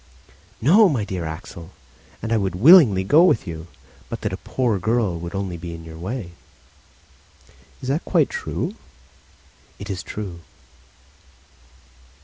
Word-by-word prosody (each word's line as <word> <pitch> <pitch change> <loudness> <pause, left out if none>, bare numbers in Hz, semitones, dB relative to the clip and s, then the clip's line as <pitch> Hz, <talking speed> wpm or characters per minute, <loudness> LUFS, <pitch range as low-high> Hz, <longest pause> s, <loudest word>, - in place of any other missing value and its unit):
"No, 190 - +6
my 120 -9 -1
dear 95 -5 -4
Axel, 80 +2 -8 0.5
and 115 0 -1
I - - +3
would 95 -3 -1
willingly 120 - +7
go 150 - +5
with 180 -13 +3
you, 80 -2 -7 0.4
but - - -6
that - - -3
a - - -3
poor 120 -6 -1
girl 105 -3 0
would 85 +3 -7
only 95 -3 -3
be 85 0 -7
in 80 - -10
your 80 0 -10
way." 95 0 -5 1.5
"Is 130 - -4
that 145 +5 0
quite 165 -6 +2
true?" - - -3 1.0
"It 100 0 -7
is 90 -3 -4
true." 95 -3 -7
100 Hz, 140 wpm, -22 LUFS, 85-125 Hz, 1.5 s, willingly